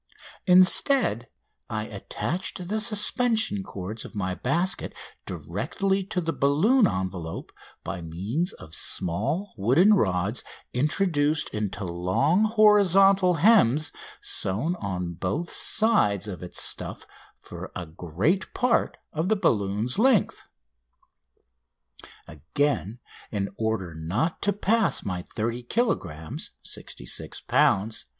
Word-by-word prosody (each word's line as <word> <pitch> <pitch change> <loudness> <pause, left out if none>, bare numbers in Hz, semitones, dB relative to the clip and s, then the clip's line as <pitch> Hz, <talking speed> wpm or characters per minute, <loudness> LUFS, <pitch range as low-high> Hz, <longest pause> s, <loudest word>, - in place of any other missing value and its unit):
Instead 180 - +4 0.4
I 110 -1 -2
attached 175 - -4
the 215 +1 0
suspension 220 -1 +1
cords 105 - -6
of - - -11
my 95 -2 -2
basket 170 - -1 0.3
directly 195 0 -2
to 195 -2 -2
the 165 -2 -2
balloon 190 - +3
envelope 90 - -4 0.3
by - - -5
means 100 - -2
of 80 - -13
small 105 - -2
wooden 135 - +5
rods 100 - 0 0.3
introduced 150 +2 +1
into 105 -2 -4
long 95 - +1
horizontal 195 -4 +5
hems 160 - +4 0.3
sewed 120 - 0
on 90 -4 -3
both 95 - -3
sides 210 - +2
to 105 - -4
its 90 - -4
stuff - - -2 0.3
for - - -9
a 90 - -4
great 90 - -2
part 245 -1 +1 0.2
of 160 +4 -1
the 220 - +4
balloon's 110 - 0
length. 240 -3 +2 1.8
Again, 110 - -2 0.3
in 100 -2 -2
order 110 -6 -2
not 90 - -2
to 205 - +2
pass 210 +2 +1
my 90 -2 -3
30 115 +6 -4
kilogrammes 120 - -2
(66 - - -5
lbs.) 105 +3 +2
140 Hz, 110 wpm, -26 LUFS, -, 1.8 s, wooden